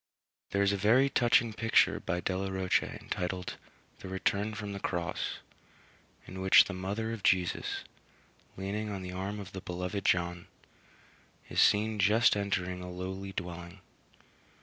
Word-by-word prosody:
There 100 0 +1
is 100 0 +3
a - - 0
very 120 +8 +4
touching 120 -2 +3
picture 115 +1 +3
by 90 -1 -2
Delaroche 95 0 0
entitled 90 0 -4 0.4
"The - - -8
Return 100 +3 -1
from 105 -2 -5
the 100 - -5
Cross," 85 -3 -2 0.9
in 95 +1 -7
which 95 0 +8
the 100 - -6
mother 100 +5 -3
of 115 - -6
Jesus, 90 -2 +1 0.7
leaning 105 +3 -3
on 100 -2 -5
the 90 - -6
arm 100 +3 -4
of 95 -1 -8
the 95 - -7
beloved 90 +3 -4
John, 85 -1 0 1.0
is - - +2
seen 105 +1 +3
just 105 +4 +5
entering 95 -3 -1
a 90 - -7
lowly 95 +2 -5
dwelling. 90 -1 -6
95 Hz, 145 wpm, -31 LUFS, 90-105 Hz, 1.0 s, which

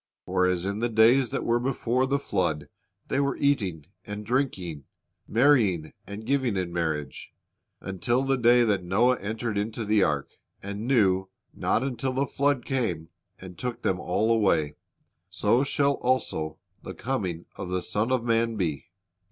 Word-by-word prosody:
For 90 - +2
as 90 -1 0
in 100 +2 -2
the 120 +1 0
days 115 +3 +5
that - - -3
were 120 0 +2
before 125 0 0
the 140 +1 +1
flood 90 - -1 0.4
they 135 - 0
were 140 0 0
eating 100 - 0 0.2
and 105 0 -7
drinking, 95 - -2 0.4
marrying 110 - +3
and 100 +2 -7
giving 130 -5 +1
in 90 -2 -2
marriage, 80 -5 -3 0.5
until 120 +7 0
the 135 0 +2
day 120 -1 +5
that 100 -5 +1
Noah 115 +8 +2
entered 110 +1 -3
into 110 +2 -3
the 105 0 +3
ark, 75 -5 0 0.3
and 100 +3 -5
knew 95 -7 +3 0.2
not 115 - 0
until 130 0 -2
the 135 +2 +1
flood 140 -2 0
came, 90 - -2 0.3
and 90 -1 -11
took 125 -2 -4
them 90 - +1
all 110 +6 0
away; 95 -10 +2 0.6
so 105 +7 +2
shall 140 0 +2
also 80 -11 -1 0.2
the - - -8
coming 95 -10 -3
of 90 - -6
the 90 0 -1
Son 110 +5 -1
of 130 -3 +1
man 115 -1 +1
be." 85 -7 -2
110 Hz, 160 wpm, -26 LUFS, 90-125 Hz, 0.6 s, days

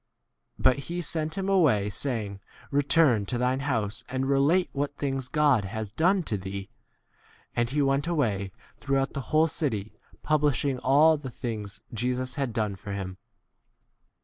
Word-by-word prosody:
But 130 - +4
he 170 - -3
c 175 - -1
sent 155 -1 -2
39 195 - -2
him - - -1
away, 110 - +3
saying, 105 -4 -2 0.3
Return 140 -6 +3
to 125 - -1
thine 125 +2 +1
house 115 -7 -1
and 130 +1 -1
relate 140 +7 +3
what 145 0 -2
things 135 -3 -2
God 145 -5 +3
has 105 +1 -5
done 180 - +2
to 105 -9 -2
thee. 95 +1 -6 0.8
And 120 0 +1
he 145 +2 +1
went 140 +3 +1
away 110 - 0 0.3
through 135 -1 +1
the 140 0 -6
whole 155 +4 +3
city 110 -10 -2 0.3
pub 155 -1 +2
lishing 140 -2 +1
all 150 +4 +5
the 140 -3 -7
things 105 -5 -6
Jesus 125 +2 -1
had 135 -4 -2
done 110 -3 -1
for 100 +1 -7
him. 95 -1 -5
130 Hz, 165 wpm, -27 LUFS, 110-145 Hz, 0.8 s, all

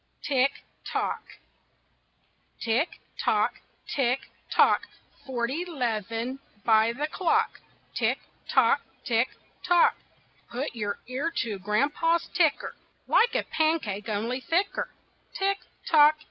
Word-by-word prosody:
TICK, 270 -1 +3 0.4
TOCK - - -1 1.4
Tick, 235 +8 +2 0.4
tock! - - +1 0.3
Tick, 255 -2 +2 0.3
tock! - - +5 0.5
Forty 260 +5 -1
'leven 240 - -2 0.3
by 220 0 +5
the 275 +6 -2
clock. 390 +8 +1 0.3
Tick, - - +1 0.3
tock! - - +4 0.2
Tick, 235 -1 +3 0.4
tock! 350 -2 +5 0.5
Put 255 +5 -2
your 205 -3 -2
ear 265 +6 -1
to 215 -4 -4
Grandpa's 290 - +1
ticker, 320 -5 +2 0.3
Like 470 0 +4
a - - +2
pancake, 270 -11 0
only 230 +5 -1
thicker. 345 - 0 0.5
Tick, 395 0 +1 0.3
tock! 305 -1 +7
265 Hz, 105 wpm, -27 LUFS, 230-330 Hz, 1.4 s, tock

